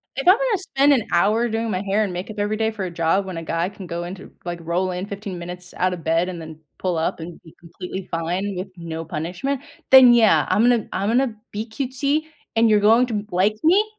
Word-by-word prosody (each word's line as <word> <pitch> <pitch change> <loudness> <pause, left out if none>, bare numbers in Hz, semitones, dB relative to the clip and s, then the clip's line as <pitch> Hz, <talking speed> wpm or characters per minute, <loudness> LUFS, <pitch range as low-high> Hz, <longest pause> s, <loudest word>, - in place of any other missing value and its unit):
If 270 +4 -4
I'm 365 - +10
gonna - - +1
spend 285 -6 +2
an 245 -6 0
hour 210 +7 +3
doing 225 +1 -2
my 185 -2 -1
hair 205 +2 +1
and 195 - -2
makeup 205 +4 -6
every 210 +1 0
day 220 0 0
for 200 -4 -4
a 180 - -5
job 170 +4 +1
when 185 -3 -6
a 165 - -5
guy 165 +2 -1
can 200 -2 -10
go 170 0 -4
into 185 +2 -8
like, 175 0 -4
roll 175 +3 -1
in 180 +1 -4
15 200 -2 -6
minutes 180 +1 -8
out 185 0 +1
of 170 -3 -7
bed 165 +3 +1
and 175 -2 -6
then 160 -1 -10 0.2
pull 180 -3 -1
up 160 - -1
and 165 +1 -9
be 160 - -16
completely 180 +2 -8
fine 180 +4 -2
with 185 +2 -4
no 165 -1 -5
punishment, 180 - -3 0.3
then, 260 -2 +9
yeah, 225 -3 +5
I'm 200 +5 +3
gonna 240 -3 +3
I'm 200 +2 -1
gonna 240 -1 +1 0.2
be 210 +2 -4
cutesy, 275 +5 -1 0.3
and 225 0 +4
you're 210 -1 +5
going 225 +4 +5
to 235 - -5
n 205 0 -3
like 190 +4 +2
me, 370 +6 +5
195 Hz, 240 wpm, -22 LUFS, 175-225 Hz, 0.3 s, I'm